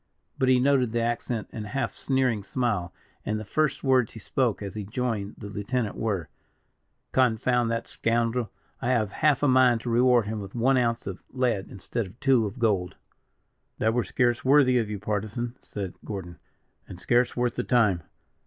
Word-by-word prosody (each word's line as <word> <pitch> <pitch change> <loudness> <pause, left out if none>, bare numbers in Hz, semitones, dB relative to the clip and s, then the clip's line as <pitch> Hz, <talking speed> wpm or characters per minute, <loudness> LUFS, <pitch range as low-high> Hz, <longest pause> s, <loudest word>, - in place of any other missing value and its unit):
But 130 - +3
he 130 -1 +5
noted 130 -3 +2
the 120 - +1
accent 120 -1 -2
and 105 -1 -6
half 115 -1 -2
sneering 130 -6 0
smile; 105 -6 -1 0.3
and 110 0 -2
the 110 - -7
first 155 +6 0
words 130 -4 +3
he 110 - -9
spoke 115 0 0
as 100 - -5
he 105 - -4
joined 105 -1 -3
the - - -9
lieutenant, 105 +2 -2
were: 100 -8 -2 0.8
"Confound 125 -1 +2
that 115 0 -2
scoundrel! 115 0 0 0.3
I - - -2
have 110 -6 +1
half 150 +2 +2
a - - +5
mind 130 -3 +4
to 120 - -3
reward 120 -1 +4
him 110 +1 -3
with 100 +1 -8
one 130 +3 +3
ounce 115 -2 +1
of 95 -1 -6
lead 125 -7 0
instead 105 +3 -4
of 95 +6 -16
two 130 -5 +3
of 100 - -8
gold." 100 -7 0 0.8
"That 110 0 +1
were 120 0 +1
scarce 120 +4 +1
worthy 130 -2 +5
of 110 -3 -2
you, 105 - -3
Partisan," 110 +4 -3
said 95 -4 -6
Gordon, 90 -5 -7 0.5
"and 90 - -10
scarce 120 +7 +1
worth 120 -1 +1
the 125 - -2
time. 105 -9 +3
115 Hz, 180 wpm, -26 LUFS, 105-125 Hz, 0.8 s, he